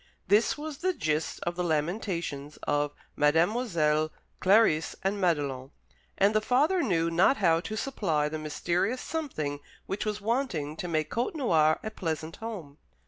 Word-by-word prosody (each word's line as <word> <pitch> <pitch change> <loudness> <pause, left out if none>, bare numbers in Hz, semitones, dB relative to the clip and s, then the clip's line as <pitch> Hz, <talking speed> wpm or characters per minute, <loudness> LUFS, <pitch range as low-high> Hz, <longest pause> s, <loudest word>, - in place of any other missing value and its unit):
This 210 +8 +3
was 300 -1 -6
the 370 +3 +1
gist 155 - -1
of 175 0 -2
the 180 - -1
lamentations 160 -3 -2
of 145 0 0 0.2
Mademoiselles 160 -1 +2 0.3
Clarice 190 -5 +4
and 200 +1 0
Madelon; 140 -7 0 0.5
and 200 +2 +4
the 215 - +3
father 295 - +2
knew 170 - +1
not 180 +11 +4
how 165 -5 +3
to 215 +5 -5
supply 175 - 0
the 155 +1 -4
mysterious 175 +9 -1
something 155 - -3 0.3
which 195 - -3
was 210 -1 -2
wanting 210 - -1
to 180 - -4
make 155 -2 -1
Côtenoir 225 - +2
a 220 - -4
pleasant 160 -4 -4
home. 185 -11 -7
175 Hz, 145 wpm, -28 LUFS, 155-220 Hz, 0.5 s, Clarice